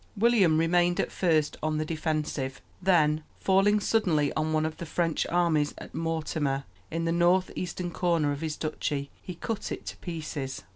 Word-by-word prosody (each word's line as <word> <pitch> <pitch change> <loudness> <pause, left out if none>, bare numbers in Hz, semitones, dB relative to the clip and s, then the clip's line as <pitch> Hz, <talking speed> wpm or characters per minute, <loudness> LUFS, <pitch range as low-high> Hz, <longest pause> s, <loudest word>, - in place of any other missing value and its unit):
William 200 -7 +4
remained 175 +1 +3
at - - 0
first 160 -5 +1
on 155 0 0
the 155 - -1
defensive; 155 -4 -2 0.2
then, 155 -5 +3 0.2
falling 195 +2 +4
suddenly 175 -10 +2
on 155 0 0
one 155 0 +2
of 160 0 -3
the 170 - -5
French 165 0 0
armies 165 -4 +2
at - - -10
Mortemer, 155 -4 -1 0.3
in 165 +1 -2
the 165 - +1
north 175 +2 +3
eastern 180 0 -3
corner 165 -4 +1
of 145 +1 -4
his 155 -2 -3
duchy, 145 -2 -2
he 180 - -7
cut 215 +4 -4
it - - -5
to - - -6
pieces. 155 - -5
165 Hz, 175 wpm, -28 LUFS, 155-175 Hz, 0.3 s, William